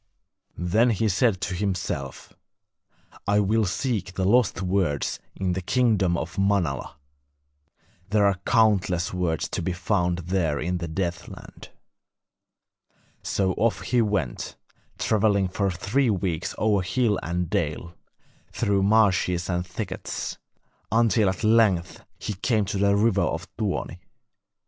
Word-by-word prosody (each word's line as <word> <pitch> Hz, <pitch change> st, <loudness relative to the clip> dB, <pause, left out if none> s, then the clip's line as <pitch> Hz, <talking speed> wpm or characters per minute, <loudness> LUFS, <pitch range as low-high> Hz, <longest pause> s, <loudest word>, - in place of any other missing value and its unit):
Then 105 Hz, +8 st, +2 dB
he 110 Hz, 0 st, +1 dB
said 105 Hz, 0 st, +2 dB
to 95 Hz, -, -2 dB
himself: 90 Hz, -7 st, -3 dB, 0.9 s
'I 105 Hz, +1 st, +3 dB
will 110 Hz, +2 st, +2 dB
seek 95 Hz, -2 st, -2 dB
the 95 Hz, -, 0 dB
lost 105 Hz, -2 st, +3 dB
words 90 Hz, -6 st, 0 dB, 0.2 s
in 95 Hz, -2 st, -1 dB
the 95 Hz, -, -2 dB
kingdom 100 Hz, -5 st, +2 dB
of 85 Hz, +4 st, -5 dB
Manala; 95 Hz, -10 st, 0 dB, 1.1 s
there 105 Hz, 0 st, +3 dB
are 100 Hz, -2 st, +2 dB
countless 100 Hz, -7 st, +2 dB
words 90 Hz, -3 st, -1 dB
to -, -, -3 dB
be 90 Hz, +2 st, -1 dB
found 90 Hz, -1 st, 0 dB
there 85 Hz, -4 st, -1 dB
in 90 Hz, +4 st, -2 dB
the 85 Hz, -, -4 dB
Deathland.' 85 Hz, +1 st, -6 dB, 1.5 s
So 95 Hz, -2 st, 0 dB
off 115 Hz, 0 st, +1 dB
he 125 Hz, -1 st, +1 dB
went, 100 Hz, -, -2 dB, 0.4 s
travelling 100 Hz, -3 st, +2 dB
for 100 Hz, +1 st, 0 dB
three 100 Hz, +9 st, 0 dB
weeks 90 Hz, -4 st, -2 dB
over 105 Hz, -2 st, +2 dB
hill 105 Hz, +3 st, +1 dB
and 90 Hz, +1 st, -2 dB
dale, 85 Hz, +2 st, -2 dB, 0.6 s
through 100 Hz, -1 st, +1 dB
marshes 95 Hz, -4 st, +2 dB
and 90 Hz, 0 st, 0 dB
thickets, 100 Hz, +4 st, -5 dB, 0.5 s
until 110 Hz, -2 st, +3 dB
at 95 Hz, +3 st, -4 dB
length 110 Hz, -6 st, +2 dB
he 105 Hz, -, -4 dB
came 105 Hz, +2 st, 0 dB
to 95 Hz, +1 st, -3 dB
the 100 Hz, 0 st, +3 dB
river 100 Hz, -1 st, +2 dB
of 85 Hz, +4 st, -2 dB
Tuoni. 100 Hz, -4 st, -3 dB
95 Hz, 130 wpm, -25 LUFS, 90-105 Hz, 1.5 s, I